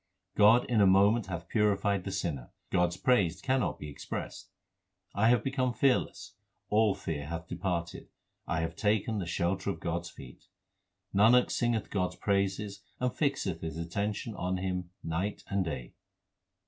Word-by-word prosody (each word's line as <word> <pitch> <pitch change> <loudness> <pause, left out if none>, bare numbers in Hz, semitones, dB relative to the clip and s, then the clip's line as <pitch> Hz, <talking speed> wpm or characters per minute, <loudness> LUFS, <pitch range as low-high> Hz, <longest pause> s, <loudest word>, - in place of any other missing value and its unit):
God 110 +4 +6
in 115 -4 +2
a 100 - +6
moment 100 +4 +4
hath 85 -1 -5
purified 100 -3 +1
the 95 - -3
sinner; 85 -10 -3 0.2
God 90 0 +3
s 85 +1 -6
praise 95 -7 +2
cannot 130 0 0
be 75 - -7
expressed. 70 - -6 0.6
I 110 +3 +3
have 120 0 +4
become 130 -2 0
fearless, 125 -5 0 0.4
all 105 -1 +4
fear 75 -4 -4
hath 85 0 -5
departed; 85 -1 -3 0.4
I 80 -2 0
have 80 0 -3
taken 110 +2 +1
the 90 - -4
shelter 90 +3 -1
of 100 - -3
God 85 0 -1
s 85 - -9
feet. - - -13 0.7
Nanak 115 +5 +5
singeth 120 -3 0
God 90 -3 0
s - - -15
praises 100 0 -1 0.2
and 125 0 0
fixeth 95 - -1
his 80 -1 -5
attention 100 +7 -3
on 90 -1 -2
Him 90 -1 -3
night 85 +5 -2
and 100 -1 +2
day. 65 -8 -5
95 Hz, 160 wpm, -30 LUFS, 85-110 Hz, 0.7 s, God